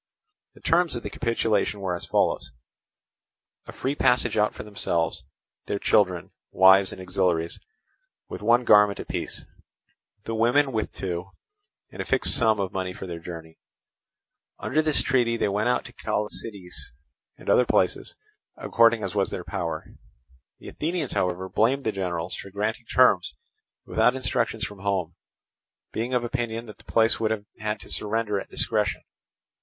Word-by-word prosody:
The - - -17
terms 170 0 +2
of 120 - -5
the 105 - -5
capitulation 110 -3 0
were 95 -2 -2
as 85 - -5
follows: 65 0 +1 1.2
a - - -7
free 135 - -2
passage 125 -5 +2
out 105 -1 +3
for - - -8
themselves, 85 -5 -1 0.4
their 100 - -1
children, 90 -4 +2 0.2
wives 95 +1 +6
and - - -9
auxiliaries, 90 -3 0 0.7
with - - -7
one 120 +3 +4
garment 105 -2 +6
apiece, - - -5 0.8
the 115 - -4
women 120 +5 +3
with 110 -3 -2
two, 90 0 -4 0.6
and - - -6
a - - -4
fixed - - +3
sum 110 -3 +3
of 95 -2 -2
money 95 -1 -2
for 95 - -8
their 85 -2 -6
journey. 80 -1 -9 1.0
Under 155 +4 +1
this 155 -2 +2
treaty 120 -3 +2
they - - +1
went 105 +4 +1
out 125 - +1
to - - -11
Chalcidice 100 - -4 0.4
and - - -15
other - - +4
places, - - +1 0.4
according 115 -1 +3
as 100 - -3
was 100 -2 +1
their 90 - -5
power. 85 -5 -4 0.7
The - - -10
Athenians, 165 -3 -2
however, 90 +1 -1
blamed 125 +8 +1
the 110 - 0
generals 90 -3 -3
for 100 - -7
granting 110 +4 -3
terms 95 - +4 0.5
without 125 - +3
instructions 115 -3 -1
from 105 -1 -9
home, 95 -4 -1 0.8
being 120 +3 -2
of 120 - +1
opinion 120 -2 -3
that 105 - -12
the - - -19
place 115 0 +4
would 110 -1 +1
have 105 -2 -2
had 105 0 -2
to - - -11
surrender 105 -1 0
at - - -9
discretion. - - 0
105 Hz, 160 wpm, -25 LUFS, 95-115 Hz, 1.2 s, wives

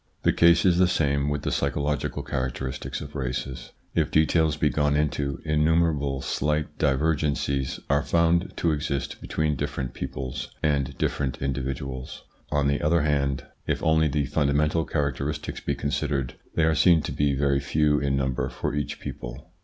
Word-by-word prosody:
The - - +4
case 85 +1 +5
is 90 -1 +4
the 90 - +6
same 70 -5 +1
with 75 -1 -2
the - - -1
psychological 70 +1 -1
characteristics 65 0 -3
of 75 0 -8
races. 65 -1 -4 0.2
If - - +1
details 80 0 +3
be 75 -1 +2
gone 75 -1 +1
into, 75 -2 0
innumerable 75 -3 +2
slight 75 +3 -1
divergencies 70 -2 0
are 70 +1 +3
found 85 +3 +1
to 85 - +2
exist 70 -2 -2
between 75 -1 0
different 65 -1 -3
peoples 65 -1 -5 0.2
and 70 -3 0
different 70 -3 -1
individuals. 65 -1 -4 0.3
On 75 -1 +2
the 70 0 +1
other 80 +1 +3
hand, 70 -3 0 0.2
if - - -1
only 80 0 +4
the 75 0 0
fundamental 75 +3 +1
charac 70 -5 0
teristics 75 +1 -4
be - - -1
considered, 70 -2 -1 0.2
they 80 - +3
are 80 0 +4
seen 80 0 +5
to - - -4
be 70 -1 +1
very 70 0 +2
few 75 +1 +2
in 70 -1 0
number 65 -2 -1
for 75 - -3
each 70 -3 -3
people. 65 +7 -8
75 Hz, 160 wpm, -26 LUFS, 70-75 Hz, 0.3 s, the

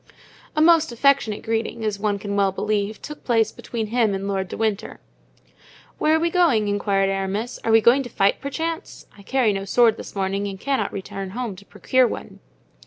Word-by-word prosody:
A 305 - +3
most 325 -3 +5
affectionate 235 -3 +2
greeting, 225 0 -2
as 205 -2 -2
one 205 -1 0
can 200 0 -4
well 200 -1 +2
believe 210 +1 -2
took 300 0 -8
place 225 -3 +2
between 230 -2 -5
him 225 -5 +2
and 195 +1 -4
Lord 195 -1 -1
de - - -7
Winter. 220 -1 -2 1.0
"Where 310 +1 +3
are - - +2
we 335 +1 0
going?" 310 - +3
inquired 200 -1 +1
Aramis; 195 +5 -3
"are 225 - +1
we 225 0 +6
going 240 +5 +5
to 250 - -7
fight, 200 -3 +1
perchance? 325 +4 -4
I 205 - -15
carry 235 0 +1
no 195 0 -3
sword 225 +3 +3
this - - -9
morning 195 +1 -1
and 195 -1 -6
cannot 275 +4 -1
return 195 0 -6
home 240 -6 -3
to 200 +2 -15
procure 255 +4 +2
one." - - -7
220 Hz, 195 wpm, -22 LUFS, 200-255 Hz, 1.0 s, we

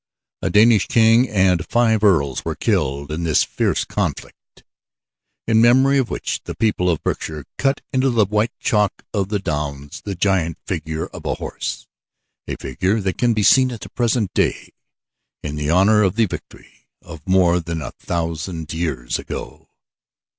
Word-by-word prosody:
A - - -1
Danish 110 0 +5
king 115 +2 +4
and 95 -4 +2
five 110 -3 +2
earls 75 - +2
were - - -3
killed 70 +2 -1
in 80 +2 -3
this 80 -2 +3
fierce - - -1
conflict, - - -5 0.8
in 110 -1 +3
memory 130 +4 +5
of 130 - -1
which - - -3
the - - -6
people 105 -5 +1
of 80 - -1
Berkshire 75 -2 -3
cut 135 0 +1
into 130 +1 +2
the 115 -4 +3
white 105 +3 0
chalk 105 -5 0
of 100 -2 -1
the 105 - 0
downs 75 -6 -4
the 100 -2 -4
giant 90 -3 0
figure 80 -2 -3
of - - -11
a - - -1
horse - - -5 0.6
a - - -3
figure 95 - -1
that 95 -2 -3
can 120 -2 +2
be 105 - +1
seen 130 +4 +5
at 115 - -8
the - - -8
present 120 -4 0
day - - 0 0.7
in 75 0 -3
honor 100 +5 +4
of 95 -1 +2
the 115 0 +3
victory 95 - -10 0.2
of 85 -2 -12
more 90 -2 +4
than 80 -2 -4
a - - -6
thousand 80 -1 -4
years 75 -8 -2
ago. - - -8
95 Hz, 165 wpm, -20 LUFS, 80-110 Hz, 0.8 s, Danish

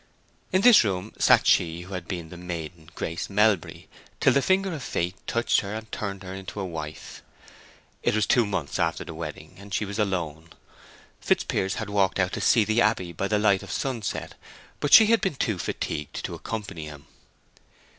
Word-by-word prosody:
In 185 - +3
this 245 - +8
room 95 0 -3
sat - - +5
she 85 0 +3
who 95 +3 -10
had 90 -2 -5
been 85 -3 -5
the 90 - -10
maiden 85 -2 -7
Grace 85 +1 -4
Melbury 105 -3 +1 0.3
till - - +4
the 140 - +3
finger 190 +3 +1
of 155 - -5
fate 90 -6 -2
touched 115 0 +2
her 100 +1 -5
and 110 0 -8
turned 100 -2 -4
her 95 +1 -7
to 95 +2 -8
a 95 - -2
wife. 80 -3 -7 0.8
It - - +1
was 110 -2 +2
two 120 - +4
months 85 -8 -3
after 85 -1 0
the 80 - -7
wedding, 80 -1 -7
and 100 +1 -12
she 105 - 0
was 100 +2 -5
alone. 85 -5 -2 0.7
Fitzpiers 95 0 0
had 110 -2 -5
walked 100 -2 +2
out 95 +1 +1
to - - -3
see 115 - +4
the 110 +3 +2
abbey 105 -6 +1
by 95 +4 -2
the 105 - +1
light 100 -2 +3
of 100 - -10
sunset, 115 +2 -3 0.5
but 145 - -1
she 225 - +10
had 225 +1 +3
been 190 -6 -1
too 110 -7 -1
fatigued 75 -3 -4
to - - -5
accompany 100 -8 -6
him. 75 -1 -11
95 Hz, 195 wpm, -26 LUFS, 85-110 Hz, 0.8 s, she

